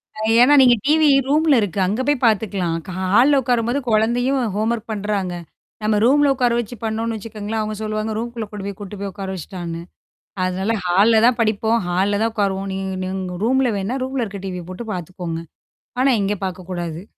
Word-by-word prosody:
அ. - - -9 0.2
ஏன்னா, 275 +4 +6
நீங்க 245 -2 +6
டிவி 310 0 +5 0.2
ரூம்ல 300 0 +4
இருக்கு. 200 -1 -2
அங்க 215 +6 -1
போய் 290 -3 +1
பாத்துக்கலாம். 195 -6 +1
க - - -10
ஹா 190 - -2
ஹால்ல 270 +5 +5
உட்காரும்போது 240 +2 0
குழந்தையும் 245 +5 +2 0.2
ஹோம்வொர்க் 225 +1 -1
பண்றாங்க. 200 -3 -2 0.5
நம்ம 215 0 +2
ரூம்ல 285 +2 +4
உட்கார 245 -2 +2
வச்சு 240 +1 -5
பண்ணோனு 225 +1 -2
வச்சுக்கோங்களேன், 215 0 -4
அவுங்க 215 0 -3
சொல்லுவாங்க. 215 0 -2
ரூம்குள்ள 235 -1 -4
கொண்டு 205 -2 -6
போய் 200 - -6
கூட்டு 205 0 -8
போய் 200 -1 -3
உட்கார 195 0 -6
வச்சுட்டான்னு. 170 -1 -6 0.6
அதனால 190 +4 0
ஹால்ல 210 +5 +4
தான் 245 -1 +3
படிப்போம். 220 +1 +2
ஹால்ல 195 +3 +1
தான் 225 0 0
உட்காருவோம். 195 -1 -1
நீங்க 190 0 -3
நீங்க 185 -1 -4
ரூம்ல 260 0 +2
வேணா, 210 +7 -2
ரூம்ல 260 -2 -2
இருக்க 200 -2 -7
டீவிய 180 -2 -5
போட்டு 225 +5 -7
பாத்துக்கோங்க. 175 -1 -5 0.6
ஆனா, 270 0 +4
இங்க 205 +1 0
பாக்கக்கூடாது. 180 -1 -5
215 Hz, 175 wpm, -20 LUFS, 190-240 Hz, 0.6 s, ஏன்னா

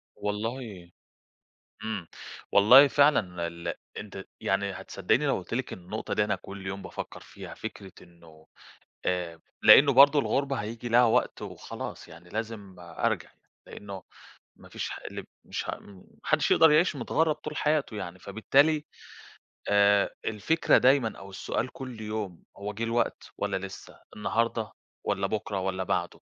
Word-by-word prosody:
والله 105 -3 -4 0.9
إمم، 105 -6 -4 0.5
والله 125 +8 +8
فعلًا 100 - +2
ال 85 0 -5 0.2
أنتِ 100 -2 -8 0.2
يعني 100 +1 0
هتصدّقيني 110 +10 0
لو 135 - +2
قُلت 95 - -6
لِك 130 +1 -3
النقطة 95 +5 -5
دي 105 - +2
أنا 105 -1 0
كل 95 +1 -10
يوم 95 +1 -4
بافكر - - -7
فيها؟ - - -10
فكرة 95 -2 -8
إنه 85 -2 -19 0.6
آآ 85 -3 -2 0.2
لإنه 140 0 +8
برضه 140 +3 +7
الغربة 140 0 0
هييجي 115 +2 -5
لها 120 +2 +6
وقت 110 - +1
وخلاص - - -7
يعني 85 +1 -14
لازم 110 -3 -5
أرجع 85 -1 -2
يعني، - - -33 0.3
لإنه 100 -2 -9 0.5
ما - - -16
فيش - - -5
ح - - -6
اللي - - -6
ب - - -21 0.2
مش - - -5
ه - - -5
م - - -19
ما 90 - -16 0.2
حدش - - +2
يقدر 160 -1 +7
يعيش 155 0 +4
متغرب 155 +5 +1
طول 150 0 -8
حياته 150 -7 0
يعني، 90 -2 -6
فبالتالي 140 - +2 0.9
آآ، 100 0 +4
الفكرة 110 +10 +2
دايمًا 130 -4 +3
أو 95 0 -11
السؤال 105 +5 -3
كل 125 -4 -8
يوم 105 -5 -5
هو 105 +1 -5
جه 115 +3 -4
الوقت 115 +1 -1
والّا - - -1
لسه؟ 95 - -11 0.2
النهارده 110 +1 -1 0.3
والّا 100 -1 0
بكرة 105 -2 -2
والّا 95 0 -2
بعده؟ - - -2
105 Hz, 155 wpm, -28 LUFS, 95-130 Hz, 0.9 s, والله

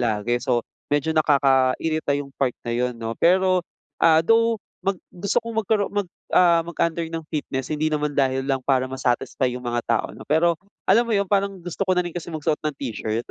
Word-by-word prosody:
lagi, 115 0 0
so, 125 -3 +1 0.3
medyo 145 +2 +1
nakakairita 140 +1 +2
'yong 140 -1 -7
part 130 -3 +1
na 120 - -1
'yon, 125 0 -1
'no. 115 0 -3
Pero, 185 +1 +4 0.4
ah, 160 -1 +6
though, 230 +3 +4 0.3
mag 195 0 +1
gusto 200 +6 0
kong 230 -1 -1
magkaro 205 0 +2
mag 205 -2 -1 0.3
ah, 170 -2 +6
mag-under 170 0 -1
ng 165 0 -5
fitness 135 -2 -3
hindi 155 +1 0
naman 150 -1 -1
dahil 135 -1 +1
lang 135 -1 0
para 130 -2 +2
ma-satisfy 130 0 0
'yong 125 - -6
mga 120 0 -1
tao, 115 -2 +1
'no. - - -10
Pero, 165 +2 +3 0.3
alam 235 - +5
mo - - 0
'yon, 200 -1 +2
parang 200 -1 0
gusto 175 +3 -3
ko 185 - +5
na - - +4
rin 175 - -5
kasi 175 -1 -5
magsuot 155 -1 -1
ng 155 -1 -2
t-shirt, 115 -2 -3
155 Hz, 200 wpm, -23 LUFS, 130-180 Hz, 0.4 s, ah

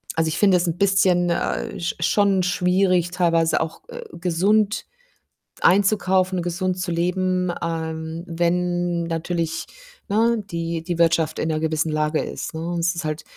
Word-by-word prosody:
also, 160 0 +1
ich - - -3
finde 195 -3 +5
es 175 0 0
'n 165 +1 -2
bisschen, 185 -2 +3
äh, 195 +3 -2
sch 170 - -2
schon 195 +2 +2
schwierig, 180 0 +2
teilweise 165 -2 +2
auch 160 0 -4 0.3
gesund, 195 +5 +1 0.8
äh, - - +5
einzukaufen, 190 -1 +2
gesund 180 +1 -2
zu 180 0 -3
leben, 180 +1 0
ähm, 160 0 -4
wenn 175 0 0
natürlich, 165 0 -2 0.4
ne, 225 +1 +2
die 165 -1 -3
die 170 0 -4
Wirtschaft 165 -2 +2
in 160 - -1
'ner 155 -1 0
gewissen 160 0 0
Lage 155 0 0
ist, - - -6
ne, 160 - -4
und 170 - -2
es 175 +1 +1
ist 170 -1 -4
halt 155 0 -3
175 Hz, 155 wpm, -22 LUFS, 165-185 Hz, 0.8 s, finde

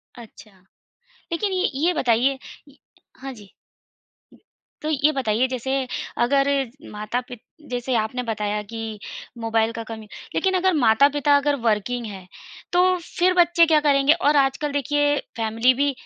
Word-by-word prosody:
अच्छा, 225 -2 -14 0.8
लेकिन 390 +4 -1
ये 370 +1 +1 0.2
ये 360 - +3
बताइए 255 +1 +2 0.3
य 285 - -21 0.4
हाँ 270 0 -7
जी। 205 -5 -15 1.3
तो 305 - -3
ये 300 0 +2
बताइए 240 -1 +1
जैसे 260 +1 -2 0.5
अगर 275 +2 +2 0.4
माता-पि 245 +4 -4 0.3
जैसे 245 0 -2
आपने 230 +3 -1
बताया 210 -2 -2
कि 225 -2 -5 0.4
मोबाइल 225 0 +1
का 230 - -4
कम 220 -1 -7 0.3
लेकिन 380 -1 +1
अगर 370 0 +2
माता-पिता 285 +3 +4
अगर 285 0 +1
वर्किंग 230 +3 0
है। 195 -4 -8 0.5
तो 355 - +5
फ़िर 355 +1 0
बच्चे 345 -1 +5
क्या 315 -2 +4
करेंगे, 285 0 +4
और 295 -2 +1
आजकल 280 +2 +1
देखिए 290 +1 +1 0.2
फ़ैमिली 225 +3 +2
भी 280 +2 +1
265 Hz, 140 wpm, -23 LUFS, 225-290 Hz, 1.3 s, तो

